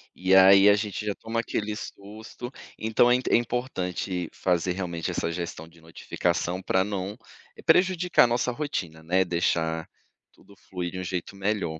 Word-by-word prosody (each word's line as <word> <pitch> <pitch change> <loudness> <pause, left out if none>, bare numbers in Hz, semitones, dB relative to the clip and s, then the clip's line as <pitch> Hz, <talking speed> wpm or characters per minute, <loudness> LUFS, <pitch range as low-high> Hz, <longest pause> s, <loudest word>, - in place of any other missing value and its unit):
E 95 +1 +3
aí, 95 +1 +8
a 100 - +6
gente 105 0 -4
já 105 - -1
toma 115 +3 -4
aquele 105 -2 -3
susto. 110 +4 -9 0.3
Então 110 +2 +3
é - - +6
inte 125 - -2
é - - +6
importante 95 -7 -2
fazer 90 -1 0
realmente 85 -3 -3
essa 85 - -2
gestão 85 -2 -5
de 85 0 -20
notificação 85 +2 -2
pra 95 0 +1
não 100 0 -4 0.5
prejudicar 180 +1 +4
a - - +4
nossa 120 +1 0
rotina, 95 - -4
né. 90 +4 +2
Deixar 80 -2 -1 0.4
tudo 100 - -20
fluir 90 -2 -6
de 95 - -6
um - - -4
jeito 90 +2 -4
melhor. 95 -5 -2
95 Hz, 170 wpm, -26 LUFS, 90-110 Hz, 0.5 s, aí